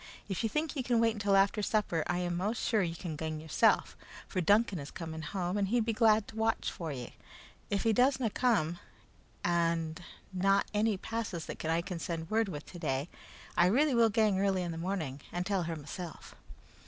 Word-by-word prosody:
If 195 -3 -2
ye 225 - 0
think 305 +6 -1
ye 275 - 0
can 245 -2 +2
wait 225 -1 +3
until 205 -2 +1
after 195 +2 +3
supper, 205 -6 +1
I 175 - 0
am 175 -1 -1
most 205 +6 -1
sure 220 -3 +3
ye 170 -3 -1
can 165 -2 -5
gang 155 0 -4
yoursel', 155 -1 +3 0.4
for 185 - -1
Duncan 205 +1 +3
is 140 - -7
coming 160 -1 -6
home 185 +3 -2
and 200 - +1
he'd 230 +2 +2
be 230 - 0
glad 220 -2 +4
to - - -11
watch 225 0 0
for 165 -3 -5
ye. 125 -4 -6 0.6
If 200 -1 0
he 225 - +3
does 255 +4 +3
na 235 -4 +1
come, 175 -9 +1 0.6
and 165 -1 0 0.3
na 195 +2 +3
ane 210 0 +2
passes 215 -5 -4
that - - -7
I 165 +1 +1
can 180 -1 -5
send 165 +1 -4
word 220 -1 +2
with 150 -4 -6
today, 155 -3 -3 0.5
I 175 - +5
really 275 +9 +3
will 230 -1 +5
gang 210 -2 +2
early 195 -2 +1
in 175 - -3
the 165 - -5
morning 165 -7 -3
and 175 +1 -2
tell 195 -1 +1
her 165 0 -3
mysel'." 160 +3 -7
190 Hz, 205 wpm, -32 LUFS, 165-220 Hz, 0.6 s, I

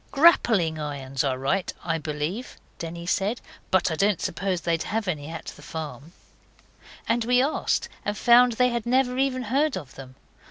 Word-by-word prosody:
'Grappling 220 - +4
irons 135 -3 -3
are 135 -2 0
right, 155 +9 0
I 165 -1 -1
believe,' 155 - -4 0.2
Denny 170 +1 -6
said, 200 +6 0 0.3
'but 185 -3 +2
I - - 0
don't 200 +2 +2
suppose 185 0 -2
they'd 165 -1 0
have 220 -1 -2
any 150 -5 -2
at 165 0 -7
the - - -15
farm.' 160 0 -7 0.9
And 230 +1 +1
we 245 +2 +3
asked, 275 +4 +1 0.2
and 205 0 -2
found 240 +2 +6
they 250 +2 +3
had 235 -1 -3
never 255 0 +2
even 260 -2 +1
heard 270 +4 +1
of 145 -7 -9
them. 130 -1 -11
190 Hz, 170 wpm, -25 LUFS, 160-245 Hz, 0.9 s, found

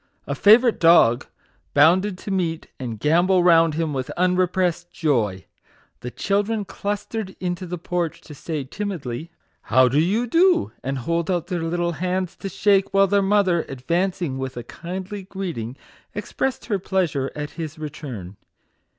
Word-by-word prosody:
A - - -2
favourite 230 +3 +5
dog 165 -8 +5 0.5
bounded 180 +7 +4
to 200 - -7
meet 170 -4 -1
and 115 -5 -5
gambol 175 - +3
round 165 -3 +5
him 160 -2 -1
with 130 -2 -3
unrepressed 180 -1 +1
joy. 110 - 0 0.5
The 125 - -6
chil 200 +10 0
dren 210 0 -3
clustered 205 0 -4
into 180 0 -3
the 180 +1 -4
porch 175 -1 -2
to 150 - -12
say, 150 0 -4
timidly, 160 - -5 0.2
" - - -44
How 130 +1 +6
do 135 +4 +2
you 200 +9 +2
do 345 +6 +3
?" - - -38
and 135 +1 -2
hold 170 +7 -1
out 175 -3 0
their 175 -1 -3
little 170 +1 -1
hands 180 +1 -2
to 195 - -5
shake; 195 +1 +2
while 195 0 +6
their 200 +1 +2
mother, 195 -3 +3
advancing 170 +2 -1
with 130 -1 -5
a 120 - -4
kindly 190 - -6
greeting, 175 - -5 0.4
expressed 265 -1 -3
her 205 -4 -1
pleasure 175 -8 -1
at 150 0 -5
his 160 -2 -6
return. 125 - -7
175 Hz, 160 wpm, -23 LUFS, 150-195 Hz, 0.5 s, How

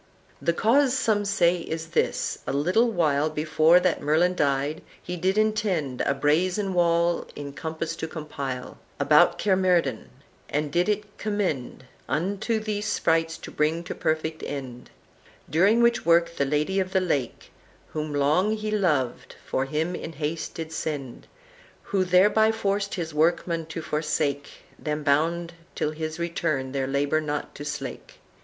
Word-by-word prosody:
"The - - +2
cause 255 +8 +3
some 215 -5 +1
say 180 -3 +3
is 165 -1 -5
this. 170 - 0
A - - -1
little 180 - +3
while 155 -7 +1
Before 155 +2 +4
that 180 -2 +1
Merlin 160 +5 +3
died, 145 -1 0 0.2
he 180 - -6
did 185 +3 0
intend 205 - 0
A 140 - +1
brazen 180 +7 +1
wall 170 -1 +2
in 140 -1 -7
compas 160 +2 -4
to 160 - -4
compile 140 -5 -6 0.2
About - - +5
Caermerdin, 180 - +1 0.4
and 150 0 -1
did 175 +6 +2
it 210 0 -3
commend 190 - -2 0.2
Unto 195 - 0
these 215 -1 -3
sprites 165 -5 +1
to - - -10
bring 155 +3 0
to - - -5
perfect 160 -1 -2
end; 130 -4 -6 0.6
During 200 +9 +4
which 235 0 +3
work 170 0 +3
the 140 - +1
Lady 150 +7 0
of 185 0 -2
the 190 - +4
Lake, 145 -9 -2 0.4
Whom 155 -1 -4
long 155 +10 +2
he 215 0 -3
loved, 155 - 0
for 130 - -1
him 155 +5 -1
in 165 -2 -6
haste 155 +2 -4
did 160 -1 -5
send; 145 -5 -5 0.6
Who, 195 -2 0
thereby 205 +5 +5
forced 200 -2 -1
his 165 -4 -4
workmen 165 +1 +1
to 160 0 -6
forsake, 150 -2 -1 0.3
Them 150 0 -3
bound 165 +4 +1 0.2
till 150 - -1
his 155 0 -5
return 165 -6 -2
their 135 -1 -1
labor 140 +3 +1
not 150 -1 -4
to 145 - -8
slack. 150 -2 -6
165 Hz, 150 wpm, -25 LUFS, 150-185 Hz, 0.6 s, About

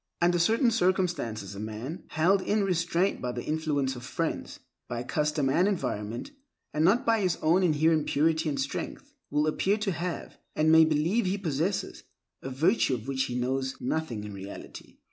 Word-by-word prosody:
Under 175 0 +3
certain 230 +7 +3
circumstances 175 - 0
a 100 - -8
man, 110 - -6
held 185 +5 +2
in 210 +2 +1
restraint 175 0 +1
by 125 - -2
the 120 0 -5
influence 150 -4 -1
of 120 - -9
friends, 165 +5 -3 0.3
by 120 0 -3
custom 150 +1 0
and 170 +8 +3
environment, 125 - -3 0.4
and 150 - +1
not 195 +8 +4
by 225 -2 +3
his 180 -3 +1
own 165 +4 +4
inherent 160 -2 +3
purity 160 +2 +2
and 140 -2 -2
strength, 140 - -4 0.2
will 150 +1 +1
appear 190 +6 +1
to 210 -2 -1
have, 175 0 -5 0.2
and 155 +1 +3
may 160 0 +8
believe 160 +8 +1
he 190 +2 0
possesses, 175 +1 -2 0.4
a 135 - -5
virtue 145 - +2
of 115 +1 -8
which 135 -1 0
he 125 - -4
knows 130 +1 -1
nothing 125 -5 -2
in 105 -1 -7
reality. 100 +1 -10
155 Hz, 175 wpm, -28 LUFS, 130-180 Hz, 0.4 s, may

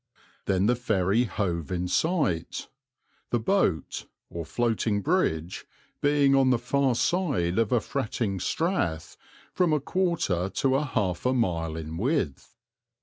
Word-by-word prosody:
Then 95 0 +2
the 120 +3 +3
ferry 110 -1 +1
hove 85 - -2
in 90 0 -1
sight, 95 - 0 0.6
the 120 - +1
boat, 110 - 0 0.2
or 85 - -4
floating 110 +1 0
bridge, 90 - 0 0.3
being 145 -1 +4
on 135 -1 +4
the 125 - +4
far 130 +1 +1
side 125 - +1
of 115 -3 +1
a 120 - +4
fretting 110 -5 -2
strath 90 - -1 0.4
from 180 -3 +2
a 150 - +3
quarter 140 - 0
to 130 +5 +1
half 110 -11 0
a 130 - +2
mile 85 -9 0
in 80 0 -6
width. 110 - -1
115 Hz, 135 wpm, -27 LUFS, 90-140 Hz, 0.6 s, being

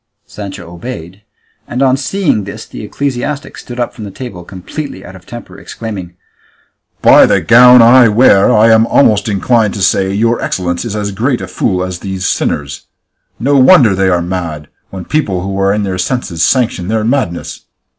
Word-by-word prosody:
Sancho 95 -4 -9
obeyed, 95 -2 -9 0.5
and 125 +3 -2
on 130 -1 +3
seeing 145 - -1
this 110 +3 -8
the - - -10
ecclesiastic 140 +5 -4
stood 120 0 -9
up 120 - -2
from 105 -3 -9
table 100 -5 -9
completely 95 - -8
out 95 - -11
of 90 -1 -16
temper, 120 -1 -10
exclaiming, 95 -6 -8 0.9
"By - - +7
the - - +2
gown 125 0 +6
I 120 +1 +6
wear, 105 -1 +4
I 115 0 +4
am 110 +1 +4
almost 110 -5 +2
inclined 105 +1 +1
to 100 - -3
say 95 0 +2
that 95 - -3
your 115 +3 0
excellence 90 +1 -3
is 110 -3 -5
as 105 -1 -3
great 120 +6 -1
a - - -6
fool 90 -4 -2
as 90 -1 -5
these 95 -1 -5
sinners. 70 -4 -3 0.5
No 140 +4 +1
wonder 130 - +5
they 95 0 +1
are 90 -1 0
mad, 85 -5 -5 0.2
when 95 -2 -8
people 105 -13 -1
who 95 +1 -4
are 95 0 +2
in 105 +1 -1
their 95 -2 -3
senses 90 -5 -3
sanction 115 - 0
their 110 +1 -1
madness! 115 -8 -3
105 Hz, 180 wpm, -13 LUFS, 95-125 Hz, 0.9 s, By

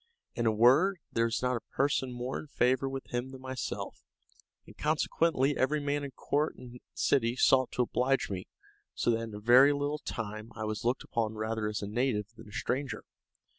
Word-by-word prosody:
In 120 -1 0
a - - +5
word, 135 - +5
there 115 - +2
was 115 +2 -1
not 125 -1 +1
a - - -13
person 135 -2 +1
more 125 +2 -4
in 155 - -9
favor 130 0 +1
with 135 -1 -7
him 120 +2 -1
than 130 0 -10
myself, 130 -1 -5 0.6
and - - -15
consequently 150 -2 +1
every 150 +4 +1
man 145 0 -1
in 140 - -4
court 145 +3 -1
and 125 -1 -11 0.2
city 120 -3 +2
sought 130 0 +4
to 125 - +2
oblige 130 +3 +1
me, 95 -2 -5 0.5
so - - +2
that 115 - +1
in 115 -2 -6
a - - -6
very 125 +6 +7
little 145 +1 -1
time 110 -3 -5
I 110 - -4
was 110 -1 -3
looked 120 +2 0
upon 110 -1 -2
rather 110 0 -2
as 105 -1 -3
a - - -3
native 110 -2 0
than 105 - -13
a - - -14
stranger. 125 +1 -2
125 Hz, 200 wpm, -30 LUFS, 115-135 Hz, 0.6 s, very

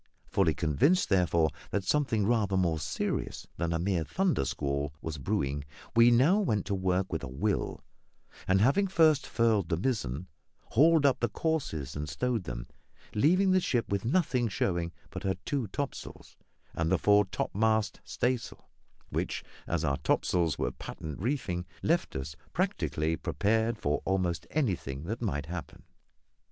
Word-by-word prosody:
Fully 85 -6 +2
convinced, 85 - +2
therefore, 85 -5 +3 0.2
that 100 - -1
something 115 -2 +1
rather 105 -4 +2
more 85 -4 +1
serious 75 -1 -3
than 85 0 -1
a 85 - +1
mere 90 -1 0
thunder 180 - 0
squall 70 +2 -2
was 80 -2 -5
brewing, 70 +2 -1 0.3
we 115 +1 +7
now 135 - +5
went 110 - 0
to 100 - -2
work 95 -1 0
with 80 - -1
a - - -3
will, 95 +11 -1 0.7
and, 95 +1 +4
having 165 - +4
first 160 -6 +4
furled 110 -6 +2
the 80 - +1
mizzen, 90 - -1 0.4
hauled 155 +3 +5
up 140 - +4
the 120 - +1
courses 130 - -2
and 75 0 -4
stowed 120 - -1
them, - - -5 0.5
leaving 185 - +4
the 185 - +5
ship 120 -9 0
with 100 -1 -1
nothing 130 -2 +1
showing 85 -4 -1 0.2
but - - -5
her 95 -1 0
two 135 -6 -1
topsails 140 +8 -6 0.4
and 80 0 -1
the 95 - +4
fore 105 +4 +4
topmast 110 +2 0
staysail, 125 -1 -2 0.4
which - - -2 0.2
as 85 -2 0
our 70 -1 +1
topsails 85 -5 +1
were - - -1
patent 75 -3 -7
reefing 110 -8 -1 0.2
left - - +1
us 65 +2 -4 0.2
practically 80 +1 0
prepared 110 +6 0
for 75 -6 -1
almost 90 -3 0
anything 90 - -1
that 110 +8 -4
might 75 - -1
happen. 85 +1 -7
95 Hz, 155 wpm, -30 LUFS, 80-120 Hz, 0.7 s, we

